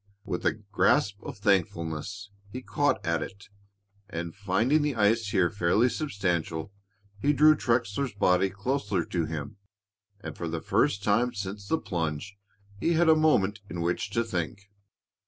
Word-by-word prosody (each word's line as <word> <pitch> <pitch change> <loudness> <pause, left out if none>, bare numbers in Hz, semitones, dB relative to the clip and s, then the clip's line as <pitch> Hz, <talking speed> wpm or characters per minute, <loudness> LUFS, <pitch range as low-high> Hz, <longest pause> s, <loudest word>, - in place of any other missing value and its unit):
With - - -2
a - - +3
grasp 100 0 +1
of - - -7
thankfulness, 95 0 -1 0.2
he 125 +3 -6
caught 145 -8 0
at 85 -1 +1
it, 100 +6 -8 0.8
finding 105 +10 +1
the 145 -2 0
ice 110 +1 +2
here 95 -4 +2
fairly 105 +6 +2
substantial. 100 - -2 0.5
He 145 +7 +2
drew 155 +1 +6
Trexler's 120 0 0
body 95 -1 +3
closer 100 - -1
to 85 -3 -1
him, 80 +6 -6 0.6
and - - -7
for 85 - -4
the 80 0 -3
first 100 +5 +1
time 115 +5 +2
since 100 0 -5
the 160 - +2
plunge 85 - -3 0.4
he 170 - +1
had 165 0 +4
a 160 - +7
moment 110 -11 +2
in 85 - -5
which 85 +3 -1
to 115 - +4
think. 100 -1 -4
100 Hz, 150 wpm, -28 LUFS, 90-120 Hz, 0.8 s, a